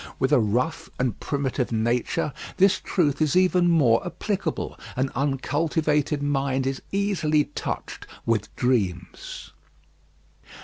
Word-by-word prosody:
With 130 - +1
a 145 - +6
rough 125 +10 0
and 125 -5 -1
primitive 135 -3 -1
nature, 120 +5 0 0.2
this 195 +1 +4
truth 150 -6 0
is 155 +1 +2
even 180 -1 +4
more 135 -9 +4
applicable. 190 -1 -3 0.2
An 130 +1 0
uncultivated 150 +1 0
mind 135 -2 0
is 135 0 -2
easily 190 -7 +2
touched - - -5 0.2
with 115 -3 0
dreams. 105 -8 -2
140 Hz, 115 wpm, -25 LUFS, 125-165 Hz, 0.2 s, a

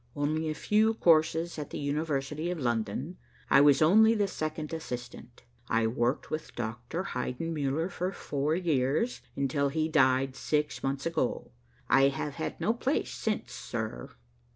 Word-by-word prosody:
Only 155 +2 0
a 155 - -2
few 220 +5 +2
courses 165 -2 +3
at 145 - -5
the - - -5
University 150 +1 -2
of 180 -2 -3
London. 120 - -2 0.3
I 140 - +7
was 145 0 +6
only 220 +7 +6
the 205 -2 +1
second 155 -3 -4
assistant. 125 -6 -7 0.3
I 115 0 +2
worked 120 +4 -1
with 155 - -5
Doctor 120 +9 -4
Heidenmuller 155 0 -2
for 180 +1 -2
four 150 -3 -1
years, 160 - 0
until 140 +1 0
he 155 +2 0
died 130 -3 +3
six 150 +1 -1
months 135 0 -2
ago. 160 -8 -1 0.4
I 135 0 +5
have 140 +1 -2
had - - -3
no 225 - +2
place 260 +5 -1
since, 215 - -2
sir." 110 - -5
150 Hz, 150 wpm, -29 LUFS, 130-165 Hz, 0.4 s, I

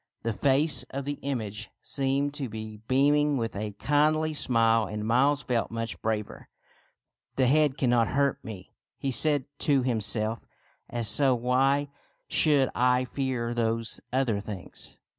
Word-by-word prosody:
The 115 - -1
face 135 +6 +4
of 140 0 -5
the 145 0 -4
image 110 -6 -4
seemed 140 +1 -1
to 140 -4 -4
be 110 0 -7
beaming 145 +2 +2
with 115 -3 -3
a 105 +1 -4
kindly 155 +5 +1
smile, 115 -5 +2
and 105 0 -5
Miles 135 +5 +2
felt 120 -2 -1
much 115 -1 -5
braver. 110 -1 -4 0.4
'* - - -56
The 130 - +2
head 145 +1 +2
cannot 120 -4 +2
hurt 140 +1 0
me," 100 -4 -9 0.3
he 135 - -3
said 145 +2 +3
to 140 -3 +2
himself; 110 -2 +1 0.3
" - - -39
and 120 -1 -3
so 130 +5 +3
why 135 +4 +1 0.4
should 145 -4 +4
I 125 +1 +2
fear 125 -3 -3
those 115 -1 -2
other 125 -5 0
things 100 -3 -9
125 Hz, 150 wpm, -27 LUFS, 115-140 Hz, 0.4 s, face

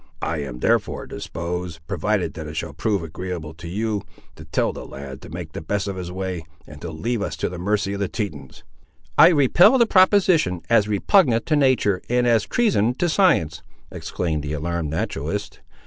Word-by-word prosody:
I 80 -1 -1
am 65 -4 -6
therefore - - +1
disposed, 85 -1 -5
provided - - -1
that 80 -1 -7
it 75 - -8
shall 80 -2 -4
prove 100 +3 -1
agreeable 80 -1 -6
to 85 +2 -10
you, 105 +3 -2 0.3
to 80 - -12
tell 80 - 0
the - - -8
lad 70 0 -9
to - - -11
make 85 -1 -7
the - - -5
best 100 +5 -2
of 100 - -3
his 90 -1 -6
way, 95 -2 -4 0.2
and 75 +1 -12
to 85 - -5
leave 110 +9 -2
us 85 -5 -3
to - - -2
the 90 0 -7
mercy 100 +2 0
of 100 - -4
the 100 - 0
Tetons." 80 - -6 0.5
"I - - +9
repel 170 - +5
the 235 - +5
proposition, 185 - +4
as 110 -3 +4
repugnant 115 - +3
to 155 - +2
nature, 130 -9 +2
and 125 0 +2
as 115 -3 +3
treason 125 - +2
to 175 - 0
science!" 85 - +2 0.3
exclaimed 80 -4 -3
the 75 +1 -4
alarmed 80 +1 -2
naturalist. 80 +7 -3
90 Hz, 190 wpm, -22 LUFS, 80-115 Hz, 0.5 s, I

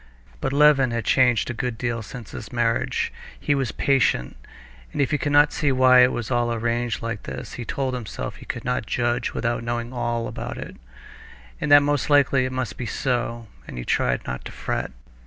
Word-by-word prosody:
But - - -2
Levin 140 -2 +5
had 115 -2 -3
changed 125 -3 +3
a - - -4
good 120 0 -3
deal 120 -1 -2
since 115 0 -9
his 105 - -8
marriage; 120 -1 0 0.3
he - - +1
was 135 -6 -1
patient, 130 - +1 0.6
and - - -6
if 140 - +2
he 150 - +1
could 145 - -1
not 145 +1 +5
see 145 -3 +1
why 130 -1 +6
it 125 0 +6
was 120 -3 -4
all 120 -1 +1
arranged 115 -1 -1
like 115 -2 -3
this, 65 0 -7
he 120 - -6
told 130 +3 -2
himself 110 - -5
that - - -16
he - - -12
could 120 -2 -5
not 125 -3 -1
judge 120 -1 -1
without 120 0 -1
knowing 120 +1 -3
all 120 -1 -1
about - - -6
it, - - -7 0.9
and 145 - -1
that 145 0 +9
most 145 0 0
likely 140 -3 +4
it 130 - -3
must 130 -2 -3
be 120 - -3
so, 120 0 -2 0.2
and - - -8
he - - -5
tried 60 -1 0
not 65 0 -5
to - - -7
fret. - - -3
120 Hz, 210 wpm, -24 LUFS, 115-130 Hz, 0.9 s, that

